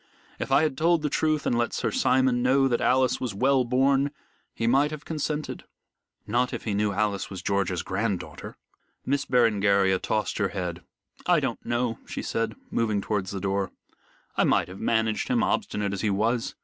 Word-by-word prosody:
If - - -4
I 140 +3 +5
had 150 -4 -1
told 165 0 +3
the 150 - -1
truth 155 -1 +1
and - - +1
let 120 0 0
Sir - - -1
Simon 130 - +2
know 135 +2 +4
that 120 -2 0
Alice 130 0 +2
was 120 -6 -3
well 130 +4 +3
born, 135 +3 +2 0.4
he 115 - -3
might 135 +5 +3
have 155 -1 -8
consented." 150 -1 -3 0.6
"Not 125 +3 0
if - - -4
he 105 - -2
knew 105 +1 +1
that 100 - -5
Alice 105 -3 0
was 95 -2 -7
George's 100 -3 0
grand 100 0 -1
daughter." - - -9 0.5
Miss 140 +1 0
Berengaria 100 -5 +3
tossed 110 0 -1
her 100 - +2
head. 90 -3 -4 0.5
"I 175 -2 +5
don't 130 -5 -3
know," 120 -1 -1
she - - -5
said, 115 0 -2 0.2
moving 110 -3 +1
towards 100 -2 -2
the 100 - -4
door. 95 0 -1 0.7
"I - - +3
might - - +2
have 95 - -9
managed 110 -1 0
him, - - +2
obstinate 100 -1 -1
as 100 - -3
he 110 - +1
was. 115 +4 0
115 Hz, 190 wpm, -26 LUFS, 100-135 Hz, 0.7 s, I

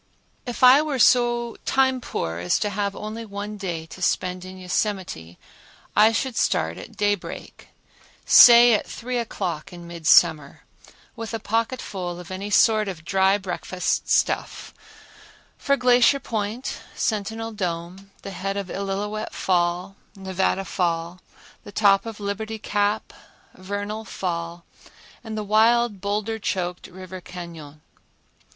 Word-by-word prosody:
If 245 +1 -4
I 255 +3 +8
were 300 -3 -2
so 240 -1 +3
time 260 -1 +2
poor 85 - -4
as 90 +1 +1
to 210 - -1
have 200 0 -2
only 215 +2 -6
one 205 0 -6
day 175 -5 -4
to 185 - -12
spend 180 0 -1
in 185 0 -10
Yosemite 180 - -3 0.6
I 215 +2 +6
should 245 +2 -2
start - - 0
at - - -12
daybreak, 205 -3 -3 0.6
say 240 0 +9
at 210 - 0
three 245 +1 -4
o'clock 190 -6 -4
in 175 -1 -10
midsummer, 160 -3 +3 0.5
with 225 0 -5
a - - -3
pocketful 210 -6 -3
of 180 0 -10
any 195 +2 -5
sort 215 0 +4
of 170 -4 -7
dry 190 +1 +3
breakfast 185 -1 -3
stuff, - - 0 0.8
for 280 0 +1
Glacier 250 +2 +4
Point, 220 +1 -4 0.2
Sentinel 220 +1 -2
Dome, 180 -1 -5
the 195 - -6
head 195 +1 -4
of 195 -2 -5
Illilouette 200 +2 -4
Fall, 180 +1 0 0.2
Nevada 190 0 -1
Fall, 170 -1 -2 0.4
the - - -11
top 200 +1 +3
of 225 -2 -7
Liberty 210 +2 -4
Cap, 205 0 -1 0.4
Vernal 205 +3 -5
Fall 170 -3 -4 0.6
and 220 -2 -6
the 215 - -2
wild 220 0 +3
boulder 210 +2 -2
choked 180 -3 -3
River 185 0 -10
Cañon. 165 -5 -10
200 Hz, 130 wpm, -23 LUFS, 180-220 Hz, 0.8 s, say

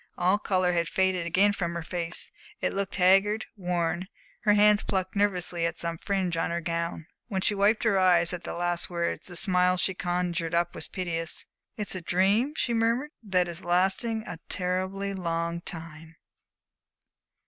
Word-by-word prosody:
All 185 +3 +3
color 185 -3 +1
had 170 -2 +1
faded 185 -2 +1
again 200 +4 +4
from 170 -3 -3
her 170 - -3
face; 170 0 -2 0.3
it - - -1
looked 200 0 -2
haggard, 195 +3 +4
worn; 180 -1 -1 0.4
her 210 - +6
hands 210 0 +5
plucked 190 -1 -2
nervously 180 -4 0
at 170 0 -1
some 170 -1 -3
fringe 190 -3 -1
on 165 - 0
her 170 0 -1
gown. 170 -1 -3 0.2
When 195 -5 -2
she 210 - +2
wiped 205 +2 +2
her 205 -4 +3
eyes 180 -2 +4
at 180 - -5
the - - -5
last 175 0 -1
words, 170 -1 -2
the 180 - -8
smile 180 0 +2
she 190 - +1
conjured 175 -2 -1
up 170 0 +1
was - - -6
piteous. 165 -3 -2 0.3
"It's 210 -2 -2
a 185 - -4
dream," 200 - +2
she 240 - 0
murmured, 230 +6 +1
"that 185 -5 +1
is 170 +1 -6
lasting 190 +6 +1
a 175 -2 -7
terribly 190 +2 -1
long 170 -2 -2
time." 165 -1 -8
180 Hz, 170 wpm, -27 LUFS, 170-195 Hz, 0.4 s, her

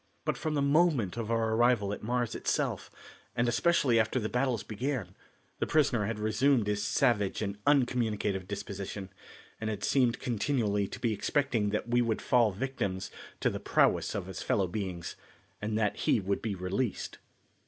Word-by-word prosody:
But - - +1
from 155 -1 -2
the 140 - +1
moment 140 - +3
of 115 -2 -4
our 115 -1 +1
arrival 115 -3 +3
at - - -6
Mars 120 +1 -1
itself, - - -1 0.5
and 120 +1 +1
especially 125 -1 +3
after 110 +4 +1
the 110 -2 -2
battles 125 -3 0
began, 115 -4 -3 0.5
the - - 0
prisoner 135 -9 +2
had 115 -1 -2
resumed 115 +3 +2
his 105 0 0
savage 105 -3 +1
and 100 0 -4
uncommunicative 115 -8 +1
disposition, 100 -1 -5 0.5
and 110 - -2
had 105 -2 -4
seemed 125 -4 +3
continually 110 -4 0
to - - -8
be 115 -3 +1
expecting 115 -1 0
that 105 +2 -2
we 120 +1 +3
would 115 -2 0
fall 120 -4 +3
victims 100 -4 -3 0.3
to - - +2
the - - -4
prowess - - +2
of 100 - -2
his 95 -1 -7
fellow 100 - +1
beings, 90 -2 -4 0.5
and 105 +1 -1
that 105 -2 +1
he - - +2
would 100 0 -1
be 110 -3 -2
released. 95 +5 -3
110 Hz, 170 wpm, -30 LUFS, 100-125 Hz, 0.5 s, moment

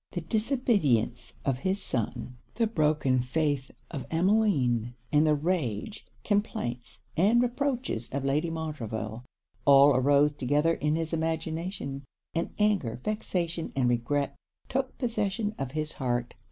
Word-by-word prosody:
The 175 - -2
disobedience 205 - +1
of 135 -2 0
his 190 +6 0
son; 125 - -3 0.2
the 230 +1 +2
broken 150 - +2
faith 140 +1 0 0.2
of 140 - -5
Emmeline; 160 - +2 0.2
and 150 +1 +4
the 150 - +4
rage, 150 - -2 0.2
complaints, 125 - -2
and 210 +8 +4
reproaches 245 - -1
of 135 0 -3
Lady 150 +5 +1
Montreville, 120 -8 -4 0.4
all 140 0 +7
arose 145 +3 +4
together 145 +4 +2
in 150 -1 0
his 165 0 -2
imagination; 160 -2 -2 0.3
and 165 0 -1
anger, 200 - +1
vexation, 175 -6 -2
and 130 -2 +2
regret, 130 +4 0 0.3
took 260 0 -2
possession 215 -3 -1
of 135 -1 -4
his 155 0 -1
heart. 120 -2 -2
150 Hz, 125 wpm, -28 LUFS, 130-195 Hz, 0.4 s, all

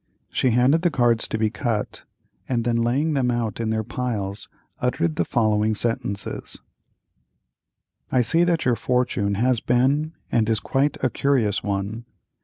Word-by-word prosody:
She 130 - +2
handed 125 +7 +3
the 175 - +3
cards 120 -6 +2
to - - -2
be 110 -1 +1
cut, 110 -1 -3 0.4
and 120 -3 0
then 120 0 +1
laying 130 +7 +1
them 130 -3 +1
out 115 -3 -2
in 115 -1 -1
their 110 0 0
piles, 105 -4 -4 0.3
uttered 85 -2 0
the - - +1
following 110 +1 +1
sentences: 105 -3 -3 1.5
"I 130 - +3
see 165 +9 +3
that 170 -3 +1
your 125 -2 +3
fortune 120 -5 0
has 125 +3 +2
been 135 +7 +1 0.2
and 115 -2 +2
is 110 -1 +2
quite 140 +2 0
a 130 - +2
curious 125 -8 +1
one. 105 +3 -3
120 Hz, 155 wpm, -23 LUFS, 110-130 Hz, 1.5 s, handed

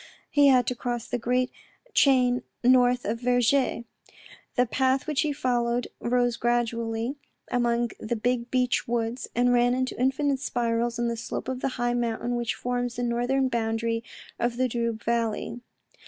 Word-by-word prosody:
He 290 -1 +5
had 255 -2 +5
to - - 0
cross 240 -1 -4
the 245 - -2
great 250 +2 0 0.4
chain 250 -3 +4 0.2
north 250 0 +4
of 225 +3 -1
Vergy. 245 0 +2 0.7
The 250 - +4
path 260 +2 +1
which 305 -3 0
he 305 -3 0
followed 245 -3 0
rose 245 0 +1
gradually 235 +1 -1 0.3
among 240 -1 +1
the 225 +2 -2
big 240 +1 -1
beech 250 -1 +1
woods, 235 +1 -2
and 245 +1 +3
ran 245 0 +3
into 255 0 -1
infinite 270 +1 +1
spirals 235 -1 -1
on 240 0 0
the 235 - -1
slope 230 0 -5
of 260 -1 -3
the - - +1
high 240 0 0
mountain 240 0 -1
which 240 -1 -1
forms 245 -1 -2
the 245 - -3
northern 245 +3 +1
boundary 230 -1 -1 0.4
of 235 0 0
the 255 0 +2
Doubs 235 -2 -2
valley. 235 0 -1
245 Hz, 160 wpm, -26 LUFS, 235-250 Hz, 0.7 s, He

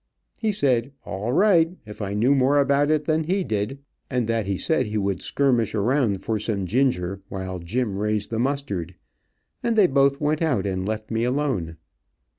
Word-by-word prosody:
He 220 -2 +1
said 135 - +1
all 105 +5 -3
right, 175 +1 +3
if 105 +1 -9
I 100 0 -3
knew 120 +7 +3
more 140 +1 +3
about 140 +1 +3
it 155 -1 +1
than 155 0 +1
he 190 +3 0
did, 105 +1 -2 0.3
and 125 -3 0
that 115 -3 0
he 100 -1 -1
said 160 - 0
he 105 +1 -2
would 100 -2 -1
skirmish 125 -6 +1
around 110 -3 +1
for 110 -1 -1
some 100 -2 -2
ginger, 100 -5 0
while 95 -1 -5
Jim 105 +5 -2
raised 105 0 -1
the 115 - -1
mustard, 120 - -2 0.7
and 235 -1 0
they 210 -3 +6
both 140 -2 +3
went 150 +1 0
out 125 - +1
and 95 -1 -2
left 110 0 -4
me 115 +1 0
alone. 125 - -1
120 Hz, 185 wpm, -24 LUFS, 100-145 Hz, 0.7 s, they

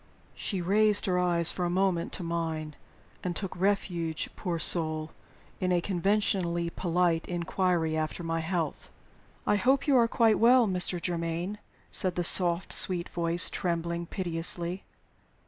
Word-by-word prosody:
She 190 -4 -3
raised 210 +3 +3
her 180 -3 0
eyes 170 -2 +3
for 180 - -4
a 175 - 0
moment 180 -1 0
to 185 - -2
mine, 160 -2 -4 0.5
and 180 -1 -3
took 195 0 -5
refuge, 175 -4 -2
poor 175 -4 -3
soul, 155 -1 +1 0.5
in 185 -1 -1
a 175 - +2
conventionally 180 -2 0
polite 175 -2 0
inquiry 175 -2 -1
after 155 +2 -3
my 165 0 -2
health. 165 -2 -4 0.6
"I 205 - +2
hope 265 +5 +1
you 285 - +2
are 235 -1 +4
quite 225 -2 +2
well, 245 +1 +5
Mr. 180 -1 -1
Germaine," 170 +3 -3 0.3
said 185 -3 0
the 175 - -1
soft, 175 +1 +5
sweet 175 -2 +3
voice, 170 0 +1
trembling 170 -1 -3
piteously. 175 0 -3
175 Hz, 145 wpm, -28 LUFS, 170-190 Hz, 0.6 s, well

